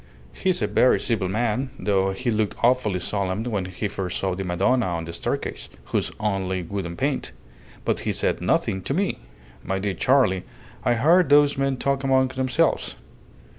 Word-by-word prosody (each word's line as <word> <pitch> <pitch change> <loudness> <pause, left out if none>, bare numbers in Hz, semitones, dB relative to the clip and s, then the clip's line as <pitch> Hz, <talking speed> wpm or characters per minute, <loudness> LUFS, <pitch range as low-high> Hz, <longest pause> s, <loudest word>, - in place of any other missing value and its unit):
He's 185 - 0
a - - +2
very 125 - +4
civil 105 -6 0
man, 120 +5 0
though 95 -2 +1
he 120 +6 -2
looked 110 -1 0
awfully 120 -6 +3
solemn 100 +2 -2
when 105 -6 -2
he 95 +3 -3
first 95 -3 -3
saw 95 -1 -1
the 95 +2 -4
Madonna 100 +7 +1
on 85 -2 -2
the 85 - -7
staircase, - - -4 0.2
who's - - -1
only 95 -3 -1
wood 95 +1 -4
and 85 0 -7
paint; - - -1 0.5
but - - +1
he - - -2
said - - -1
nothing 95 - +1
to 135 - -2
me. 195 +3 0 0.4
My 95 - -2
dear 100 0 -1
Charley, 125 -7 +2 0.4
I 120 - +2
heard 165 +7 +4
those 145 0 +5
men 135 -1 0
talk 140 +1 0
among 130 -1 +3
themselves. 130 -1 0
105 Hz, 175 wpm, -24 LUFS, 95-130 Hz, 0.5 s, those